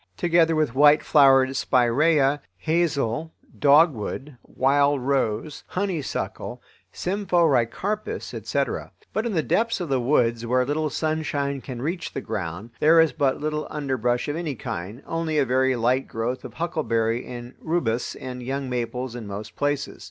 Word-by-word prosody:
Together 170 Hz, -2 st, +3 dB
with 155 Hz, -6 st, +1 dB
white 145 Hz, +2 st, +6 dB
flowered 135 Hz, -2 st, +5 dB
spiraea 135 Hz, +6 st, +3 dB
twenty 140 Hz, +1 st, +3 dB
feet -, -, -25 dB
high, -, -, -33 dB, 0.3 s
hazel, 160 Hz, -3 st, 0 dB, 0.3 s
dogwood, 145 Hz, -2 st, +3 dB
wild 140 Hz, +1 st, +2 dB
rose, 135 Hz, +1 st, -1 dB
honeysuckle, 185 Hz, -6 st, -3 dB, 0.3 s
symphoricarpus, 180 Hz, -, 0 dB
etc. -, -, -2 dB, 0.2 s
But 220 Hz, +2 st, 0 dB
in 225 Hz, -, -2 dB
the 160 Hz, -4 st, +1 dB
depths 230 Hz, 0 st, +1 dB
of 175 Hz, -4 st, -4 dB
the 135 Hz, -1 st, +2 dB
woods, 120 Hz, -3 st, +2 dB
where 125 Hz, +2 st, +1 dB
little 150 Hz, +3 st, -1 dB
sunshine 145 Hz, -3 st, -2 dB
can 125 Hz, -2 st, -7 dB
reach 170 Hz, +4 st, -3 dB
the -, -, -3 dB
ground, 100 Hz, 0 st, -5 dB
there 160 Hz, +2 st, +6 dB
is 160 Hz, -1 st, +4 dB
but 135 Hz, -2 st, +1 dB
little 150 Hz, 0 st, -2 dB
underbrush 130 Hz, -4 st, -1 dB
of 145 Hz, -, -2 dB
any 160 Hz, -4 st, -3 dB
kind, 105 Hz, +3 st, -6 dB
only 165 Hz, -1 st, -2 dB
a 145 Hz, -, +3 dB
very 130 Hz, +1 st, +2 dB
light 125 Hz, +3 st, +1 dB
growth 115 Hz, +3 st, -3 dB
of 125 Hz, -3 st, -9 dB
huckleberry 120 Hz, -8 st, -1 dB
and 120 Hz, 0 st, -8 dB
rubus 125 Hz, -8 st, -1 dB
and 125 Hz, -1 st, -7 dB
young 135 Hz, +1 st, -3 dB
maples 125 Hz, 0 st, -3 dB
in 115 Hz, -4 st, -7 dB
most 105 Hz, +2 st, -7 dB
places. 145 Hz, -1 st, -2 dB
140 Hz, 155 wpm, -24 LUFS, 120-155 Hz, 0.3 s, white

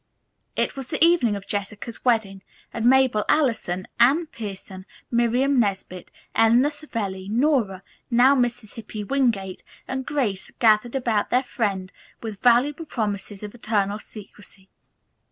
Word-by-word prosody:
It -, -, -1 dB
was 270 Hz, -2 st, -6 dB
the 315 Hz, 0 st, +3 dB
evening 330 Hz, -11 st, +3 dB
of 200 Hz, -1 st, -7 dB
Jessica's 210 Hz, +3 st, -5 dB
wedding 220 Hz, -6 st, +1 dB, 0.3 s
and 230 Hz, -, -2 dB
Mabel 260 Hz, -5 st, +4 dB
Allison, 220 Hz, -, +1 dB
Anne 275 Hz, +8 st, +4 dB
Pierson, 195 Hz, -7 st, -9 dB, 0.2 s
Miriam 245 Hz, +3 st, +2 dB
Nesbit, 190 Hz, -4 st, -2 dB, 0.2 s
Eleanor 240 Hz, +6 st, +4 dB
Savelli, 205 Hz, -11 st, -5 dB
Nora, 225 Hz, -6 st, +1 dB, 0.3 s
now 255 Hz, +3 st, +5 dB
Mrs. 240 Hz, -4 st, -1 dB
Hippy 215 Hz, -2 st, -7 dB
Wingate, 215 Hz, -7 st, 0 dB, 0.3 s
and 265 Hz, 0 st, -3 dB
Grace 250 Hz, -10 st, -2 dB
gathered 225 Hz, +2 st, +3 dB
about 235 Hz, -5 st, 0 dB
their 250 Hz, +2 st, +2 dB
friend 195 Hz, -7 st, -2 dB, 0.3 s
with 220 Hz, -3 st, -7 dB
voluble 270 Hz, +6 st, +3 dB
promises 205 Hz, -6 st, -4 dB
of 210 Hz, -, -7 dB
eternal 210 Hz, -3 st, -1 dB
secrecy. 205 Hz, -2 st, -13 dB
230 Hz, 130 wpm, -24 LUFS, 200-260 Hz, 0.3 s, now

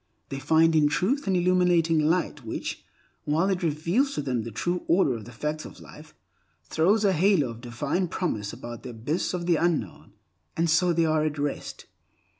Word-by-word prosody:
They 135 Hz, -, -4 dB
find 160 Hz, +3 st, +3 dB
in 150 Hz, -2 st, +5 dB
Truth 230 Hz, -, 0 dB
an 190 Hz, -, +2 dB
illuminating 175 Hz, -2 st, +3 dB
light 170 Hz, +4 st, 0 dB
which, -, -, -5 dB, 0.4 s
while 165 Hz, +6 st, +1 dB
it 185 Hz, -, -1 dB
reveals 170 Hz, -, 0 dB
to -, -, -2 dB
them 125 Hz, -4 st, -1 dB
the 115 Hz, -, -6 dB
true 175 Hz, -, -2 dB
order 170 Hz, -6 st, +3 dB
of 110 Hz, -3 st, -7 dB
the 120 Hz, -, -11 dB
facts 150 Hz, +6 st, -4 dB
of -, -, -11 dB
life, -, -, -14 dB, 0.5 s
throws 200 Hz, +7 st, +2 dB
a 195 Hz, -, +4 dB
halo 175 Hz, -5 st, +3 dB
of 115 Hz, 0 st, -11 dB
divine 140 Hz, +9 st, -2 dB
promise 110 Hz, -, -3 dB
about 120 Hz, 0 st, -8 dB
the -, -, -8 dB
abyss 130 Hz, +11 st, -2 dB
of 175 Hz, -1 st, -4 dB
the 170 Hz, -2 st, +3 dB
unknown; 160 Hz, -, -2 dB, 0.4 s
and 165 Hz, 0 st, +2 dB
so 175 Hz, +2 st, +3 dB
they 165 Hz, -1 st, +2 dB
are 155 Hz, -1 st, +2 dB
at 155 Hz, -1 st, -2 dB
rest. 145 Hz, 0 st, -4 dB
160 Hz, 190 wpm, -26 LUFS, 140-180 Hz, 0.5 s, in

